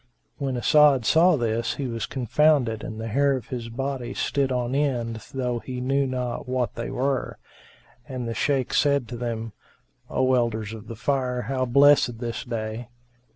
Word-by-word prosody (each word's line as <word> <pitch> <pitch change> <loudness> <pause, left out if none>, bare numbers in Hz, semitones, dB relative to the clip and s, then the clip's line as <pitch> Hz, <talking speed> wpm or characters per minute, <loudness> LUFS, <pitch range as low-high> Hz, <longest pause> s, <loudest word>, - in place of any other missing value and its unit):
[FN#381] 140 - -2
When 130 -2 -1
As'ad 140 -1 +5
saw 170 +7 +5
this, 115 -3 -1
he 140 - -3
was 115 -3 -3
confounded 130 -3 +2
and 110 0 -6
the 110 - -4
hair 140 +4 +2
of 130 - -7
his 120 -3 -5
body 130 0 -4
stood 135 -1 0
on 125 0 -1
end 125 -5 0
though 125 -2 -2
he 125 +1 -6
knew 135 +2 +1
not 125 0 -3
what 125 -4 -1
they 115 - -5
were; 135 0 -1 0.7
and 130 -4 -5
the 115 - -2
Shaykh 135 0 0
said 140 -4 +2
to 125 - -5
them, 115 -2 -4 0.6
"O 130 0 +2
Elders 115 -3 0
of 110 -2 -10
the 115 - -7
Fire, 125 0 -1
how 130 -1 -1
blessed 140 +2 +5
is 120 - -7
this 115 0 -4
day!" 115 -1 -4
125 Hz, 180 wpm, -25 LUFS, 115-135 Hz, 0.7 s, As'ad